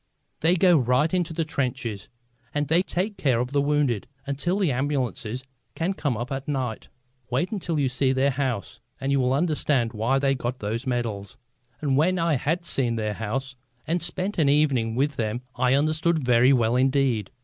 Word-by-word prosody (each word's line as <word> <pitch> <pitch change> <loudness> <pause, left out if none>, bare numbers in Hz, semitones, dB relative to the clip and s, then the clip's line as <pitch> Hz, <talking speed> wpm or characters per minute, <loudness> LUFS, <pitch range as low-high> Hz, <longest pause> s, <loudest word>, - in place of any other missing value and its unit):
They 165 +3 +3
go 180 -2 +5
right 125 +6 +2
into 175 -3 0
the 165 0 -1
trenches, 125 - -3 0.5
and 145 0 0
they 165 +3 +4
take 195 +2 -2
care 130 -5 +2
of 125 +2 -2
the 140 0 +2
wounded 140 -7 +1 0.2
until 145 +7 -1
the 190 -7 +2
ambulances 130 -3 -2 0.3
can 175 +4 -1
come 145 - -2
up 120 +5 -5
at 135 0 -4
night. 130 -6 -3 0.4
Wait 130 - 0
until 175 -7 -2
you 140 - +2
see 130 +1 +1
their 135 +1 +2
house 125 - -3 0.2
and 135 +1 -1
you 140 - +3
will 125 -1 +2
understand 140 -5 +1
why 115 +5 +1
they 135 0 +2
got 125 -1 -3
those 115 +4 -3
medals." 110 -6 -3 0.4
And 140 -3 +1
when 180 +5 +3
I 165 -1 +1
had 165 +6 -1
seen 125 -6 +1
their 105 -2 -2
house 130 +6 -4 0.3
and 165 +3 0
spent 185 +3 -2
an 145 -3 +4
evening 135 -6 +2
with 140 +2 0
them 115 +2 -2
I 125 +1 +3
understood 155 +3 +2
very 125 +1 +5
well 120 -3 +3
indeed. 130 -5 +2
135 Hz, 185 wpm, -25 LUFS, 120-155 Hz, 0.5 s, go